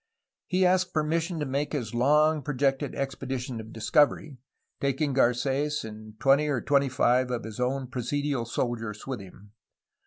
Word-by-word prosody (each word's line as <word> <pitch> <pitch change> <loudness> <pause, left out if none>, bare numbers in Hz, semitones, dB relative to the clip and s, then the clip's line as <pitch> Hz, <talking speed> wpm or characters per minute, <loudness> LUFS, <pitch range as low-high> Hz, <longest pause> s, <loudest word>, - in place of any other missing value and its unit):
He 185 0 +2
asked 185 0 +2
permission 165 +2 0
to 150 - -1
make 140 +3 -2
his 120 -7 -3
long 150 +5 +3
projected 135 -1 0
expedition 130 -3 -4
of 110 0 -11
discovery, 135 +5 +1 0.4
taking 140 +1 0
Carets 135 +3 +1
and 110 0 -10
twenty 140 +3 +4
or 140 -4 0
twenty 140 0 +2
five 130 0 +2
of 120 -2 -2
his 110 0 -8
own 130 +2 0
presidial 130 0 -2
soldiers 115 -3 -3
with 130 -4 -4
him. 100 +1 -14
135 Hz, 150 wpm, -27 LUFS, 120-145 Hz, 0.4 s, twenty